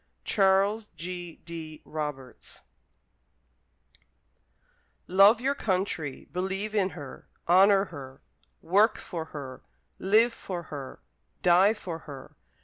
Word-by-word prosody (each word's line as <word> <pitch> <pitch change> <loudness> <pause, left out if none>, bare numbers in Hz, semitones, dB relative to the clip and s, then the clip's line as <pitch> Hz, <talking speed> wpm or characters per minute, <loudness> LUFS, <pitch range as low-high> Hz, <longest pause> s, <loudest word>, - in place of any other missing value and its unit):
Charles 200 +2 +2
G. 175 +1 -6
D. 160 -2 -8
Roberts 150 -4 -7 2.4
Love 200 +5 +6
your 270 +3 +1
country, 185 - -2
believe 190 +4 -2
in 200 -3 +2
her, 145 -7 -10 0.2
honour 195 +3 +6
her, 135 -7 -11 0.4
work 205 +6 +3
for 165 -3 -6
her, 140 -5 -8 0.4
live 220 +5 +4
for 180 -6 -6
her, 135 -3 -7 0.4
die 185 +5 +5
for 170 -6 -6
her. 140 -4 -11
180 Hz, 100 wpm, -28 LUFS, 155-200 Hz, 2.4 s, Love